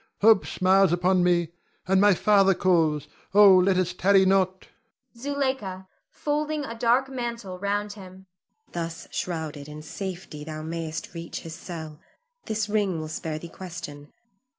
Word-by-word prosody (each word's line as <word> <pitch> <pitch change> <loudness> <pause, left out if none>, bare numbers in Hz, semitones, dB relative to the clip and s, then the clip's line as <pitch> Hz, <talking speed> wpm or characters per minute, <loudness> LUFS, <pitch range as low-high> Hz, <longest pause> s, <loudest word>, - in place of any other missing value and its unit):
Hope 220 -1 +5
smiles 190 -1 +3
upon 180 +1 +2
me, 175 -2 +2 0.4
and 190 +1 +4
my 205 -2 +6
father 195 0 +4
calls. 160 -5 +2 0.3
Oh, 205 -2 +9
let 185 +1 +4
us 185 -1 0
tarry 190 +1 +4
not. 190 -1 +1 0.5
Zuleika 260 -8 -3 0.2
[folding 300 0 -2
a 230 - -6
dark 240 +3 +2
mantle 235 -7 -5
round 205 +1 -1
him]. 190 -2 -12 0.5
Thus 165 -1 -5
shrouded, 155 -4 -4
in 150 0 -9
safety 180 -3 -6
thou 155 0 -6
mayst 160 0 -5
reach 170 -1 -6
his 165 - -8
cell; 160 -3 -8 0.5
this 215 -1 -1
ring 205 -5 0
will 155 0 -5
spare 155 0 -4
thee 170 - -8
question. 165 -6 -9
185 Hz, 145 wpm, -26 LUFS, 165-205 Hz, 0.5 s, Oh